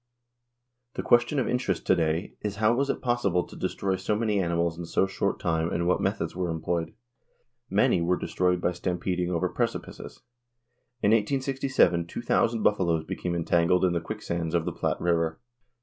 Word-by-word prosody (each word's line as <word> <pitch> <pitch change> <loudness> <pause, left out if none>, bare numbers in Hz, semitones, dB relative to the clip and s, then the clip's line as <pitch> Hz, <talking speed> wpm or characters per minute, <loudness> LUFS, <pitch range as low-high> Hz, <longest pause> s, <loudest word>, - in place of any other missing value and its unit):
The - - -3
question 120 +4 +3
of 130 - +1
interest 125 -8 -1
to - - +4
day 80 +2 -1
is 105 -1 -3
how 110 +2 +3
was 140 +3 0
it - - -2
possible 120 -8 +1
to - - -13
destroy 95 -1 -2
so 95 +3 -1
many 105 -2 0
animals 85 -1 0
in 85 0 -6
so 95 - +2
short 95 0 -1
a - - -18
time 80 -1 0
and 85 - -1
what 90 - +2
methods 100 -1 -1
were 90 -1 -2
employed? 80 +3 -2 0.7
Many - - +3
were 90 +2 +1
destroyed 90 +2 0
by 90 - +1
stampeding 90 0 -2
over 85 -2 0
precipices. - - -4 0.8
In 100 - +4
1867 130 -5 +2
two - - -6
thousand 115 -1 +1
buffaloes 85 -6 +2
became 90 0 -3
entangled 85 +2 +2
in 90 - +2
the 85 - -1
quicksands 85 -4 -3
of 85 -1 +1
the - - -2
Platte - - -1
river. 85 -2 0
90 Hz, 180 wpm, -27 LUFS, 85-105 Hz, 0.8 s, to